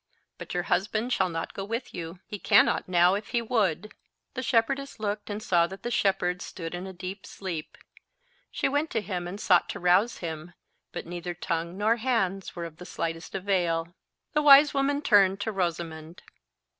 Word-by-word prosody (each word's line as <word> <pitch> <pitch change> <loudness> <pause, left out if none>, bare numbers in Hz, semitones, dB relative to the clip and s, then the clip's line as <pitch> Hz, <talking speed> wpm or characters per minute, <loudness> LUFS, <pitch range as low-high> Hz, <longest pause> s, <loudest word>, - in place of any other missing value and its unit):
But - - -7
your 175 - 0
husband 215 +7 0
shall 190 -1 +2
not 165 -1 -4
go 195 - -5
with 230 +5 -4
you. 170 +1 -7
He 205 - -7
cannot - - +4
now 175 0 +5
if 205 +2 -3
he 240 - 0
would." 215 -4 0 0.4
The 255 - -3
shepherdess 260 +2 0
looked 210 0 -3
and 210 +1 -4
saw 170 -4 +3
that 190 +2 -10
the 240 - -3
shepherd 180 -4 +1
stood 165 -3 -6
in 180 +2 -5
a - - -6
deep 190 +2 -7
sleep. 175 -5 -6 0.7
She - - 0
went 290 +3 0
to 225 - -1
him 180 -3 -4
and 195 +3 -6
sought 180 -4 +3
to - - -4
rouse 180 +6 +3
him, 165 0 -6 0.4
but - - -6
neither 175 +1 -5
tongue 170 +1 -3
nor 220 +3 +2
hands 220 -6 -1
were 170 -1 -4
of 160 -2 -10
the 180 - -10
slightest 165 +1 -4
avail. 175 -4 0 0.4
The 300 - +3
wise 290 0 +8
woman 285 +1 +1
turned 195 -4 +5
to 220 - -1
Rosamond. 170 -3 -4
190 Hz, 185 wpm, -27 LUFS, 175-220 Hz, 0.7 s, wise